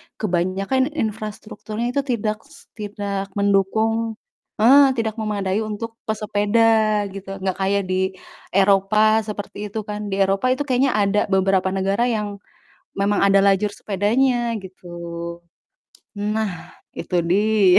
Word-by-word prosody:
kebanyakan 195 +7 0
infrastrukturnya 215 +1 -4
itu 280 - 0
tidak 215 -3 -1
s - - -19
tidak 200 -1 -4
mendukung 220 +3 +1 0.5
heeh, 270 +2 +7
tidak 225 -1 -2
memadai 205 -2 -1
untuk 225 +1 -5
pesepeda 215 0 +2
gitu, 195 0 -7
gak 190 -1 -3
kayak 200 +1 +1
di 185 0 -1 0.4
Eropa 205 +3 +4
seperti 210 0 -5
itu 215 +2 -5
kan. 210 0 -5
Di 195 0 +1
Eropa 195 +5 +1
itu 290 - -2
kayaknya 260 -2 +1
ada 205 0 +2
beberapa 190 -1 +2
negara 195 +5 +1
yang 210 -4 -2 0.6
memang 200 +1 +1
ada 195 0 +5
lajur 200 +1 +3
sepedanya 235 +5 0
gitu. 190 -2 -13 1.3
Nah, 210 +1 -1 0.5
itu 180 - -2
dia, 200 +2 +4
210 Hz, 120 wpm, -21 LUFS, 195-220 Hz, 1.3 s, heeh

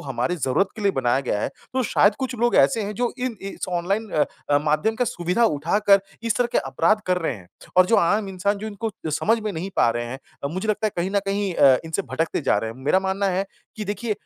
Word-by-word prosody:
हमारी 135 +5 -2
ज़रूरत 150 +7 +1
के 215 - -6
लिए 200 - +4
बनाया 130 0 +1
गया 115 -6 -1
है, - - -1 0.2
तो 260 - +1
शायद 205 -2 +3
कुछ 260 -1 -3
लोग 240 0 +3
ऐसे 140 +11 +4
हैं, 205 +1 -4
जो 240 +3 0
इन 250 -3 -2
इस 195 0 -5
ऑनलाइन 195 +5 -1
अ, 145 -1 0
माध्यम 155 +9 +1
का 245 - +1
सुविधा 180 +3 0
उठाकर, 200 +4 +3 0.2
इस 230 -2 0
तरह 245 - +2
के - - +3
अपराध 165 +11 +1
कर 180 0 +2
रहे 160 - -1
हैं। 90 -3 -16 0.3
और 185 0 +7
जो 225 - +3
आम 200 +4 +2
इंसान, 195 +2 -1
जो 215 - -6
इनको 220 +1 -4 0.2
समझ 220 +9 +2
में 215 -1 -3
नहीं 180 +3 -5
पा - - +4
रहे 120 +1 -2
हैं 130 +3 -6 0.3
अ, - - +2
मुझे 185 +7 -4
लगता 215 +1 +1
है, 210 - -2
कहीं 175 +2 -1
न - - +6
कहीं 200 -1 -1
अ, 135 -2 +6
इनसे 160 +5 -2
भटकते 165 0 -1
जा 135 - +2
रहे 110 +1 -3
हैं, 115 - -11
मेरा 185 +6 +3
मानना 190 +1 -1
है 195 - 0 0.3
कि 215 - -4
देखिए 210 +2 -2
195 Hz, 250 wpm, -23 LUFS, 155-215 Hz, 0.3 s, और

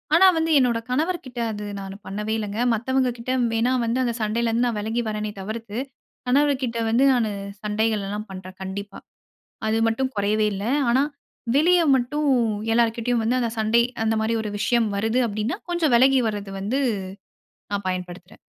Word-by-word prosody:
ஆனா, 365 +3 +7
வந்து 325 0 +1
என்னோட 245 -4 +3
கணவர்கிட்ட 270 -2 -2
அது 210 -1 -6 0.2
நான் 195 0 -7
பண்ணவே 210 +3 -3
இல்லேங்க. 210 +1 -4
மத்தவங்கக்கிட்ட 250 +1 -1 0.2
வேணா 230 +3 +2
வந்து 235 +3 0
அந்த 240 -2 0
சண்டையிலேருந்து 230 +2 +1
நான் 235 -3 -2
விலகி 220 +3 -1
வரேனே! 215 0 -3
தவிர்த்து 215 +2 -6 0.5
கணவர்கிட்ட 265 -3 +2
வந்து 235 +4 +3
நானு 230 -4 +1 0.3
சண்டைகள்லாம் 210 -1 -1
பண்றேன், 185 0 -9
கண்டிப்பா. 195 +1 -6 0.7
அது 220 +1 +1
மட்டும் 260 +4 0
குறையவே 210 +1 +2
இல்ல. 200 +1 -4 0.3
ஆனா, 260 +3 +4 0.5
வெளிய 350 +5 +5 0.2
மட்டும் 290 +4 0 0.4
எல்லார்கிட்டேயும் 235 0 +1
வந்து 245 +3 +1
அந்த 235 -2 0
சண்டை, 225 +2 +3 0.2
அந்தமாரி 220 +1 +1
ஒரு 210 - -3
விஷயம் 235 0 +2
வருது 220 +5 +1
அப்பிடின்னா 215 - -2
கொஞ்சம் 325 -6 +1
விலகி 260 +2 +5
வரது 205 -2 -5
வந்து 220 +8 -1 0.9
நான் 200 -1 -2
பயன்படுத்துறேன். 180 0 -6
225 Hz, 145 wpm, -23 LUFS, 210-250 Hz, 0.9 s, ஆனா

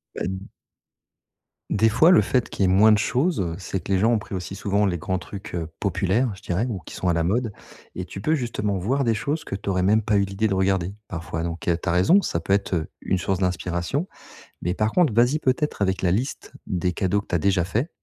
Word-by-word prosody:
Bah, - - -6
d 95 +1 -6 1.2
des 110 +2 +3
fois, 125 +10 +5
le 180 - +7
fait 125 -3 0
qu'il - - -2
y - - +5
ait 90 - +3
moins 105 +3 +6
de 105 - +5
choses, 130 - +1
heu, 85 -3 -2
c'est 95 0 -3
que - - -5
les 95 - +3
gens 110 +4 +3
ont 115 - +3
pris 110 -1 -8
aussi 95 0 -4
souvent 100 +1 +1
les 90 -2 -1
grands 95 +3 -2
trucs, 95 +3 -9
heu, 85 -2 -3
populaires, 100 +5 +1
je 95 - -15
dirais, 90 +6 -1
ou 110 -6 -3
qui - - -10
sont 90 - -1
à - - +3
la 85 0 +1
mode 110 +5 0 0.4
et 90 - -5
tu 95 - -8
peux 155 - +1
justement 115 -8 -1
voir 130 +10 0
des 115 -3 +2
choses 145 +8 -2
que - - -5
tu 100 - -5
aurais 90 -1 +1
même 105 +4 +4
pas 105 0 0
eu 100 - +3
l'idée 100 +3 -1
de 100 - 0
regarder 95 -1 +1
parfois 80 -1 -4
donc 85 0 -3
tu - - -2 0.2
as - - +3
raison, 95 - +4
ça 85 - -1
peut 90 +4 0
être, 100 -1 0
heu, 80 -3 0
une 95 - 0
source 95 +1 0
d'inspiration. 90 - -1 0.5
Mais 90 +1 -1
par 105 +2 +1
contre 175 -4 +3
vas-y 120 +7 +3
peut-être 140 -2 0
avec 95 -1 0
la 90 - +3
liste 120 +9 -2 0.2
des 90 0 -1
cadeaux 95 +3 +1
que 100 - -9
tu - - -1
as - - +2
déjà 95 +1 +2
faits, 115 - -1
100 Hz, 255 wpm, -24 LUFS, 90-115 Hz, 1.2 s, le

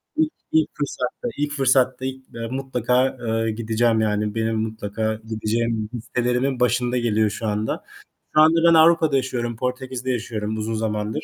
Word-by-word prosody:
ilk 315 0 +2 0.2
ilk 160 -1 +3
fırsatta 140 - -3
ilk 145 0 -1
fırsatta 130 -2 +2
ilk, 130 0 -5
eee, 115 0 -4
mutlaka, 130 -1 0
eee, 115 0 0
gideceğim. 115 +1 +1
Yani, 105 0 0
benim 115 0 0
mutlaka 110 0 -2
gideceğim 110 0 -2
listelerimin 125 +2 -1
başında 125 0 +1
geliyor 110 -3 +2
şu 110 - -5
anda. 105 +1 -2 0.5
Şu - - +6
anda 160 +1 +6
ben - - +5
Avrupa'da 160 -2 +5
yaşıyorum. 120 -3 -2
Portekiz'de 130 +1 -3
yaşıyorum 110 -3 -3
uzun 110 +1 -2
zamandır. 110 -1 -2
120 Hz, 150 wpm, -23 LUFS, 110-130 Hz, 0.5 s, Şu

